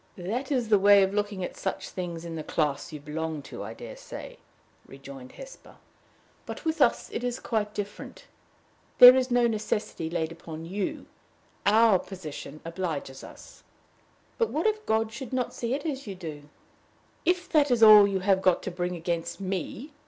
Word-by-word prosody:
"That 230 +10 -4
is 245 -5 0
the 210 -2 +5
way 200 0 +7
of 190 +1 0
looking 205 -2 -2
at - - -5
such 190 - -4
things 170 -2 -6
in 170 - -6
the 155 - -5
class 150 0 -1
you 150 - -7
belong 155 +1 -4
to, - - -9
I - - -7
dare - - -9
say," - - -10 0.5
rejoined 135 -1 -11
Hesper; - - -12 0.7
"but - - -7
with 320 -1 -1
us 245 - +2
it - - -4
is 245 0 -2
quite 215 -2 -2
different. 205 0 -7 0.7
There 250 +1 +11
is 260 -1 +1
no 245 -1 +3
necessity 215 -6 -2
laid 165 -1 -2
upon 165 -1 -9
you. 190 +3 -4 0.6
Our 215 -2 +5
position 155 -5 -9
obliges 165 -6 -4
us." - - -13 0.8
"But 460 - +2
what 315 - -2
if 430 0 0
God 220 0 +1
should 260 +2 -8
not 255 -1 -1
see 240 +2 -2
it 285 - -6
as 275 -6 -4
you 195 - -5
do?" 150 -5 -9 0.7
"If 360 0 +1
that 295 -3 +3
is 240 -2 +3
all 210 -2 +10
you 195 -2 -1
have 190 0 +2
got 185 -2 +2
to 190 - -4
bring 180 0 -3
against 170 +1 -3
me! 195 - -5
200 Hz, 180 wpm, -27 LUFS, 170-245 Hz, 0.8 s, There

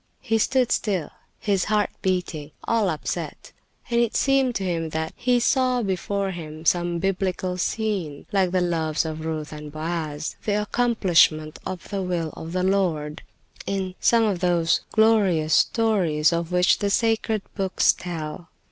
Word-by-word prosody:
He 225 0 +1
stood 255 +2 +2
still, 190 -8 0 0.3
his 200 -3 0
heart 210 -1 +1
beating, 180 -5 -2
all 225 -4 +1
upset; 155 -3 -4 0.4
and 235 - +3
it 235 -2 0
seemed 270 -3 +2
to 195 - -1
him 165 -3 -1
that 160 0 -3
he 245 -1 +2
saw 250 +1 +2
before 195 0 -1
him 160 -2 -8
some 175 0 +2
biblical 185 0 -1
scene, 190 -9 -2
like 190 -2 +2
the 185 0 +1
loves 165 -3 0
of 155 0 -5
Ruth 155 -1 -4
and 150 0 -8
Boaz, 155 -1 -4
the 210 -1 +1
accomplishment 185 -9 +2
of 185 -2 -6
the 200 -2 -2
will 175 -4 -2
of 160 - -7
the 180 +1 -1
Lord, 170 -6 0 0.5
in 190 -2 -2
some 230 -1 +4
of 200 -5 0
those 170 -2 +2
glorious 195 -8 +3
stories 180 -9 +3
of 170 0 -2
which 180 0 +3
the 200 - 0
sacred 220 0 +1
books 190 -1 +2
tell. 165 -1 -6
180 Hz, 155 wpm, -24 LUFS, 160-210 Hz, 0.5 s, some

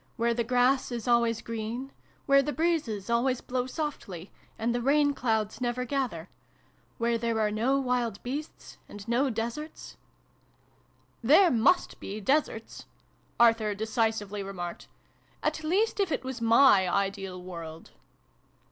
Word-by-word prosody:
Where 235 0 +1
the 235 0 0
grass 250 +2 +2
is 235 -2 -4
always 235 -1 +2
green, 230 +4 -5 0.3
where 275 0 +5
the 295 - -2
breezes 300 - -1
always 240 +2 +1
blow 250 0 -3
softly, 255 - -5 0.3
and 230 +1 0
the 240 - -1
rain 285 +3 +3
clouds 220 -4 -1
never 250 0 -1
gather; 245 - -2 0.7
where 235 0 0
there 230 -1 -1
are 210 -1 +1
no 245 +6 +1
wild 245 -5 -1
beasts, 285 +5 -6
and 205 +1 -10
no 250 +4 +2
deserts 235 +7 -5 0.6
" - - -37
There 355 +3 +7
must 255 +10 +2
be 205 +2 -6
deserts," 225 -1 -1 0.5
Arthur 225 -3 +4
decisively 220 -2 -1
remarked. 180 -3 -6 0.3
" - - -35
At 305 +1 -1
least 400 +8 +1
if 390 -4 +1
it - - -1
was 260 -2 -5
my 230 -5 +5
ideal 195 -1 -2
world." 165 -3 -9
235 Hz, 140 wpm, -28 LUFS, 215-270 Hz, 0.7 s, There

